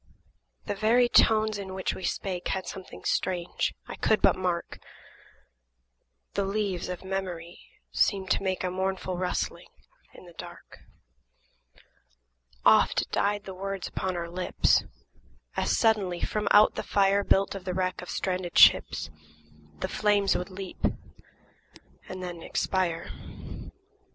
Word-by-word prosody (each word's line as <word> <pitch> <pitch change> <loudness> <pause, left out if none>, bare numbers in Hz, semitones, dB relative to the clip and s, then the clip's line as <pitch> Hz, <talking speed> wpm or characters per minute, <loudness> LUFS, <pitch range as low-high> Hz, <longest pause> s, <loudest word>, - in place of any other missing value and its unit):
The - - -2
very 230 +5 +3
tones 215 -3 +4
in 190 -1 -6
which 190 - -1
we - - -8
spake 180 -2 -2
Had 190 -1 -2
something 190 -1 -9
strange, 180 -2 -1
I - - -6
could 220 - +2
but - - +4
mark; 180 -2 -2 1.5
The 200 - 0
leaves 195 -3 -2
of 180 0 -5
memory 180 -3 -4 0.3
seemed 195 -3 +1
to - - +2
make 190 -1 -1
A 180 - -1
mournful 190 0 -2
rustling 180 -1 -2 0.5
in - - -13
the 175 - -14
dark. - - -11 1.9
Oft - - +4
died 205 0 +1
the 190 - -7
words 195 0 -4
upon 185 -1 -3
our 170 -1 -3
lips, 180 +2 +2 0.7
As - - +1
suddenly, 200 -6 +2
from 210 -1 -1
out 210 +1 +6
the - - -3
fire 200 0 +2
Built 195 0 +2
of 195 -2 -7
the 185 -1 -3
wreck 185 -1 -1
of 180 - -9
stranded 180 -2 -2
ships, 80 - +6 0.7
The - - 0
flames 205 -2 +2
would 180 - -2
leap 190 -1 -8 1.3
and 185 0 -6
then 175 -2 -6
expire. 170 -1 -1
190 Hz, 135 wpm, -28 LUFS, 180-200 Hz, 1.9 s, out